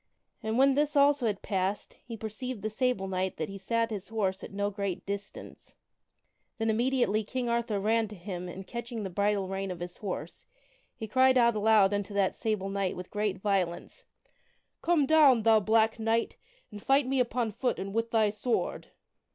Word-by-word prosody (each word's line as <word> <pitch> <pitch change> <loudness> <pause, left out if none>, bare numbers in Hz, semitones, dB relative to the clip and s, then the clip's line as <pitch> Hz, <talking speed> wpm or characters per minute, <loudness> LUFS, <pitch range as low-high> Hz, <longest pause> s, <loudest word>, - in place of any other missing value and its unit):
And 220 +1 -2
when 270 +1 +5
this 295 +2 +1
also 280 -3 +4
had 205 -2 -3
passed 195 +1 -2
he 230 -2 -8
perceived 220 +1 -6
the 215 - -2
Sable 230 -4 0
Knight 185 0 -2
that 155 - -3
he 195 0 -8
sat 230 +3 0
his 200 -3 -5
horse 200 -4 -2
at - - -8
no 205 +1 -1
great 200 -2 -4
distance. 200 +1 -7 0.8
Then 225 -1 +1
immediately 235 -2 +1
King 250 +3 -3
Arthur 235 -3 0
ran 220 +2 +1
to 210 - -10
him 180 -1 -6
and 190 +2 -8
catching 235 +1 -5
the 190 - -5
bridle 200 +1 0
rein 195 +1 -3
of 180 -2 -5
his 175 0 -7
horse, 195 -4 -6 0.5
he 220 - -6
cried 260 +3 +4
out 235 -2 +4
aloud 210 -2 +4
unto 205 0 -3
that 195 -2 +2
Sable 215 -4 -2
Knight 195 -2 -1
with 180 0 -8
great 210 -2 -1
violence: 195 - -2 0.8
"Come 330 -4 +3
down, 275 -6 +5
thou 225 -1 +6
black 220 +2 +2
knight! 225 +1 0 0.4
and 205 -1 -9
fight 275 +3 +3
me 265 +1 0
upon 235 -2 0
foot 245 +5 -1
and 195 +1 -5
with 230 +1 -1
thy 220 -2 +2
sword." 220 +4 -2
215 Hz, 185 wpm, -29 LUFS, 195-235 Hz, 0.8 s, thou